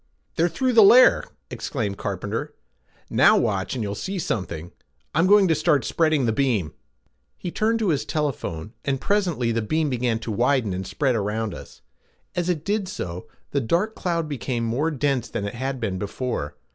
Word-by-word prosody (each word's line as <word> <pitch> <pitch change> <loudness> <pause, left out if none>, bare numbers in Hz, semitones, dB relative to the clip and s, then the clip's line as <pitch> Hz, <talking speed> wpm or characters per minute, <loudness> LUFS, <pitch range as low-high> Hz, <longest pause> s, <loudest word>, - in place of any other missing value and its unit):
"They're 170 +2 +2
through 255 +6 0
the 225 - +8
layer," 245 +5 +7 0.3
exclaimed 105 -8 -3
Carpenter. - - -4 0.6
"Now - - +6
watch, - - 0
and 120 - -2
you'll 100 -1 -3
see 190 - -4
something. 90 - -3 0.4
I'm 165 +3 +3
going 205 -1 +6
to 165 - +4
start 150 -3 +2
spreading 155 -5 +2
the 115 - +2
beam." 110 - 0 0.6
He 175 - -5
turned 220 +5 +1
again - - +1
to - - +2
his 145 - -1
telephone, 120 - -3
and 135 -1 -1
presently 175 - 0
the 115 0 0
beam 155 +6 0
began 120 -2 0
to 115 - -4
widen 120 -1 +1
and 95 +1 -4
spread 135 -4 0
out. 105 0 -2 0.8
As 175 0 -1
it 165 -4 -1
did 205 -1 0
so 90 - -6 0.2
the 140 - +1
dark 175 - 0
cloud 170 -6 -2
became 130 -4 -3
more 125 +8 0
dense 135 -6 -1
than 100 - -3
it 100 - -4
had 130 +2 -3
been 100 -5 -2
before. 105 - -3
135 Hz, 180 wpm, -24 LUFS, 110-165 Hz, 0.8 s, the